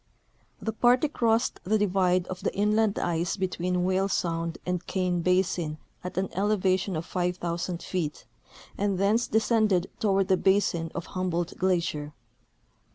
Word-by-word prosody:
The 220 - -3
party 245 +6 +4
crossed 235 -4 +1
the 210 +5 +2
divide 185 -3 +2
of 180 0 -7
the - - 0
inland 210 +1 +2
ice 170 +2 -1
between 180 -1 -1
Whale 190 +2 +1
sound 165 -2 -1
and 180 -1 -2
Kane 180 -2 0
basin 175 -3 +1 0.3
at 180 0 -6
an 190 +1 +1
elevation 190 -1 +1
of 160 +1 -3
5,000 175 -1 -2
feet, 165 -5 -3 0.5
and 200 -1 +1
thence 210 +5 +2
de 220 - +1
scended 215 -5 +2
toward 195 -2 +2
the 190 - +3
basin 180 -4 +1
of 170 - -4
Humboldt 175 -2 -2
glacier. 170 -5 0
185 Hz, 145 wpm, -27 LUFS, 175-200 Hz, 0.5 s, party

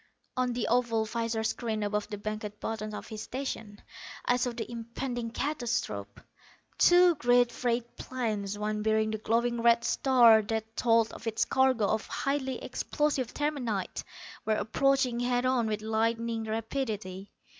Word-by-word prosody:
On 255 -1 0
the 240 -1 -1
oval 230 -2 +2
visor 230 0 -2
screen 220 -1 -2
above 210 0 -1
the 205 - -5
banked 210 0 -5
buttons 215 -1 -4
of - - -7
his 215 -1 -6
station 230 -6 -5 0.5
I 245 - +3
saw 250 0 0
the 235 0 -6
impending 235 +1 -4
catastrophe. 245 -1 -3 0.6
Two 355 0 +7
great 245 -5 +3
freight 240 -1 -2
planes, 215 -6 -3
one 210 0 -2
bearing 220 0 +2
the 220 - -3
glowing 235 +2 0
red 235 0 +5
star 235 -4 +5
that 220 +1 -4
told 230 -2 +3
of 230 - -8
its 225 -1 +1
cargo 260 -5 +3
of 215 - 0
highly 265 -2 -2
explosive 275 -1 -1
terminite, 250 -10 -2 0.4
were 220 - +1
approaching 255 +3 +1
head 245 0 +1
on 255 -3 +2
with 215 0 -2
lightning 225 +1 0
rapidity. 215 -4 -4
230 Hz, 145 wpm, -29 LUFS, 220-250 Hz, 0.6 s, Two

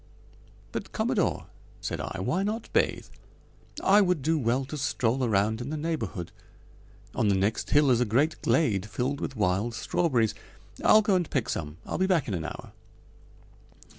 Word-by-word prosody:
"But, - - -6
Commodore," - - 0 0.3
said - - -4
I, - - -5
"why 145 - 0
not 215 +3 -3
bathe? - - +1 0.8
I 205 +2 +6
would 180 -7 +1
do 160 +2 +2
well 125 +2 0
to 145 - -7
stroll 130 -3 0
around 110 0 +1
in 125 - -5
the 155 - -3
neighborhood. 150 - -3 0.8
On 110 - +1
the 100 - +3
next 100 +3 0
hill 145 -2 +4
is 120 -1 +3
a - - +3
great 135 +9 +1
glade 105 - +1
filled 125 +7 -2
with 135 - -4
wild 105 +3 0
strawberries. 120 -5 +1 0.5
I'll 215 0 +6
go 205 - +2
and 180 -3 +1
pick 125 -3 -1
some. 75 0 -4
I'll - - -4
be 190 - +2
back 175 -7 +2
in 105 - -2
an 85 -3 -3
hour." - - -7
125 Hz, 170 wpm, -27 LUFS, 110-160 Hz, 0.8 s, I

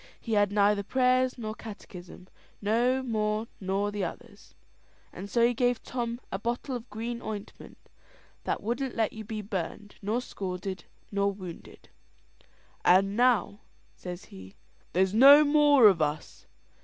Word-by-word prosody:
He 230 - -4
had 205 -1 +3
neither 205 0 +3
prayers 255 +3 +1
nor 215 -2 -5
catechism 185 -5 -11 0.3
no 240 +5 +1
more 215 -2 -1
nor 195 +2 -1
the 205 -1 -3
others; 205 +4 -9 0.6
and 200 +2 -8
so 235 +2 +3
he 245 - +2
gave 245 0 0
Tom 240 -1 -4
a 195 - -3
bottle 240 +4 -3
of 240 0 -8
green 235 +3 -5
ointment, 210 -2 -8 0.7
that - - -2
wouldn't 245 +4 -2
let 225 -2 0
you 220 - -7
be 215 0 -6
burned, 205 +1 -5
nor 215 +4 -1
scalded, 190 -4 -6 0.3
nor 200 0 +1
wounded. 185 -4 -11 0.9
"And 195 +2 +4
now," 230 -4 +2 0.4
says 180 0 -8
he, 95 0 -13 0.4
"there's 190 +2 +2
no 280 +6 +9
more 290 -3 +5
of 185 -5 +3
us. 150 0 -3
210 Hz, 145 wpm, -28 LUFS, 195-240 Hz, 0.9 s, no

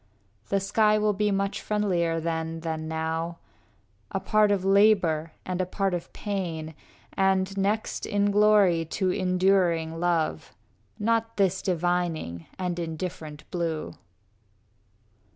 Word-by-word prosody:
The 200 - +2
sky 210 +2 +3
will 210 0 +2
be 210 +1 +1
much 200 0 -1
friendlier 175 -6 0
then 165 0 -3
than 160 -1 -3
now, 160 +1 -2 0.7
A 195 - -2
part 210 +1 +3
of 195 -2 0
labor 195 -6 +3
and 185 0 -2
a - - 0
part 195 0 -1
of 175 -1 -4
pain, 170 -6 -4 0.4
And 190 0 +1
next 205 +3 -1
in 205 -1 +1
glory 205 -5 +4
to 185 +3 -1
enduring 180 -3 +1
love, 165 - -1 0.4
Not 225 +1 0
this 190 -2 +2
dividing 175 - -1
and 180 -2 -2
indifferent 160 -2 -5
blue. 165 -3 -2
180 Hz, 120 wpm, -26 LUFS, 165-200 Hz, 0.7 s, glory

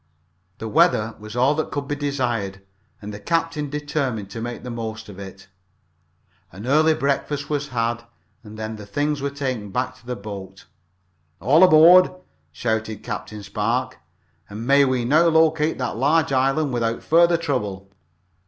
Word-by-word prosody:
The 110 - -6
weather 115 -6 +2
was 110 +1 -9
all 130 +4 +3
that 155 +1 -2
could 145 -1 -4
be 145 - -2
desired, 120 -9 -2 0.4
and 105 +1 -6
the 105 - -7
captain 160 +4 -1
determined 140 -8 -3
to 115 - -6
make 120 +1 -5
the 125 - -6
most 110 -2 -6
of 100 -1 -11
it. 95 0 -10 1.0
An 100 +6 -9
early 155 +4 +4
breakfast 145 0 -2
was 145 -1 -1
had, 120 -2 -2 0.4
and 110 -1 -11
then 110 0 -5
the 105 -1 -10
things 145 +6 -1
were 140 - -1
taken 130 -7 -4
back 125 +6 -2
to - - -23
the 125 - -3
boat. 100 -2 -9 0.7
"All 140 - +5
aboard!" 180 +1 +8 0.4
shouted 110 +4 -3
Captain 105 -1 -6
Spark. 120 +6 -2 0.5
"And 105 +3 -7
may 140 +2 +5
we 130 -2 0
now 155 +7 +4
locate 160 -1 +3
that 125 -3 -3
large 145 +4 +2
island 135 +2 +1
without 115 -1 -1
further 170 +1 +4
trouble." 105 - -3
125 Hz, 160 wpm, -22 LUFS, 110-145 Hz, 1.0 s, aboard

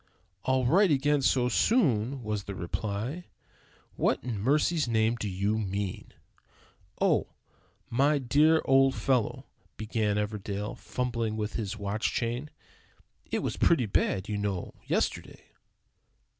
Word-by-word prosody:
"All 130 -1 +2
right 185 +10 +4
again 145 0 +2
so 125 -2 +2
soon?" 130 - +2
was 105 -2 -3
the 100 - -6
reply. 110 - -4 0.7
"What - - +1
in 120 -5 -3
mercy's 150 - +2
name 110 0 +2
do 105 -3 -4
you 100 +4 0
mean?" 100 -2 -4 0.9
"Oh, - - +1 0.5
my 140 +5 +2
dear 150 +5 +3
old 135 0 +4
fellow," 125 -5 0 0.3
began 110 -1 -1
Everdell, 105 +1 -3
fumbling 115 -3 -3
with 105 -1 -3
his 110 -1 -3
watch 100 +1 -1
chain, 120 +5 -2 0.8
"it - - -1
was - - -2
pretty 160 -8 +3
bad, 95 -2 0
you 105 -1 -2
know, 100 -3 -3
yesterday." - - -2
115 Hz, 125 wpm, -28 LUFS, 105-135 Hz, 0.9 s, right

